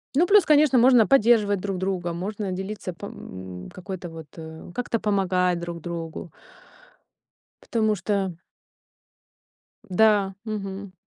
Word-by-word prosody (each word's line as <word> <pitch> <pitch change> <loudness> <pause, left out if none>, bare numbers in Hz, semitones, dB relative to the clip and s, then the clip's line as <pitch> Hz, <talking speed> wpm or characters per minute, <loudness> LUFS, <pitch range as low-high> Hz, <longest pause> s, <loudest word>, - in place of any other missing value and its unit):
Ну 345 +5 +4
плюс, 410 -2 +6
конечно, 300 -3 +5
можно 245 -2 +6
поддерживать 220 -6 +4
друг 195 0 -3
друга, 185 -2 -2
можно 195 +3 -4
делиться 190 0 -5
по, 200 +4 -8
м 95 -1 -9
какой-то 185 -1 -7
вот, 160 -2 -10
э, 160 +1 -9
как-то 245 -2 -1
помогать 185 -4 +1
друг 170 -1 -6
другу. 165 -1 -6 1.3
Потому 220 -2 +1
что 190 -2 -1 1.5
Да, 200 0 +3
мгм. 200 -2 -5
195 Hz, 120 wpm, -25 LUFS, 175-215 Hz, 1.5 s, плюс